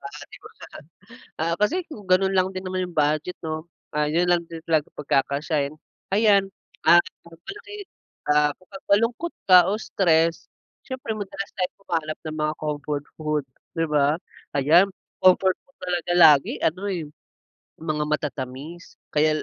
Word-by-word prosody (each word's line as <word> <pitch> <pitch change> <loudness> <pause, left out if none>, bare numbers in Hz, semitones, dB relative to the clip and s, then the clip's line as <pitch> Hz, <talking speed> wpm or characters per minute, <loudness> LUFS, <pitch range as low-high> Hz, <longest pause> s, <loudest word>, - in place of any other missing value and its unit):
ba? - - -7 1.3
Ah, 165 +1 0
kasi 320 - 0
kung 265 -10 -10
ganun 190 0 +2
lang 185 0 +2
din 185 0 -6
naman 185 0 -2
yung 170 - -17
budget 155 +4 0
'no, 155 0 -3 0.3
ah, 150 0 +1
'yun 175 +3 +2
lang 175 -1 +3
din 165 -1 -9
talaga 155 -3 +1
pagkakasyahin. 145 +1 0 0.3
Ayan, 200 -1 +4 0.3
ah, 175 - +7 0.2
malaki, 390 - -11 0.5
ah, 150 0 +4
pag 190 +1 -13
malungkot 230 +11 +2 0.2
ka 185 -1 +7
o 210 - -1
stress 165 -5 +1 0.4
s'yempre 260 -4 -4
madalas 195 0 -5
tayong 180 +2 -2
humanap 155 -4 -3
ng 155 0 -4
mga 155 0 0
comfort 145 -1 -3
food 150 -2 -1 0.3
'di 165 - +2
ba? 145 0 +3 0.4
Ayan 165 +8 +6 0.4
comfort 185 0 +5
food 275 - -33
talaga 175 -1 -1
lagi 150 -5 +6
ano 185 +5 0
eh, 170 -5 -3 0.8
mga 150 -2 -1
matatamis 150 +2 -5 0.2
kaya 155 +1 +3
170 Hz, 140 wpm, -24 LUFS, 150-190 Hz, 1.3 s, ah